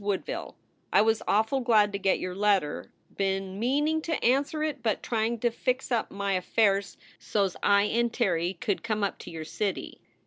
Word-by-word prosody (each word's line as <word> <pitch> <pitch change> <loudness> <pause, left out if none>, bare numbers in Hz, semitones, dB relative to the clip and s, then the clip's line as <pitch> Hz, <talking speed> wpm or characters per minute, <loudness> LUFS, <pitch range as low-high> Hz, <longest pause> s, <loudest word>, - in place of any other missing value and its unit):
WOODVILLE. 200 -2 -3 0.4
I - - +5
was 220 0 +2
awful 220 +6 +2
glad 220 -5 +3
to 200 - -3
get 195 -1 +2
your 185 - -4
letter. 195 -6 0 0.3
Been 195 0 -1
meaning 295 +7 +1
to 320 -1 -2
anser 280 +5 +2
it 295 -4 -2
but 220 -2 -1
trying 230 0 0
to 240 - +2
fix 255 +3 -2
up 235 -2 0
my 200 0 -2
afairs 195 +2 +1 0.2
sos 195 -3 0
I 200 0 +4
and 235 +2 +1
Terry 180 -6 0
could 205 +2 -2
come 215 -2 -2
up 200 - -2
to - - -9
your 160 -2 -6
city. 200 +4 -4
210 Hz, 180 wpm, -28 LUFS, 195-240 Hz, 0.4 s, I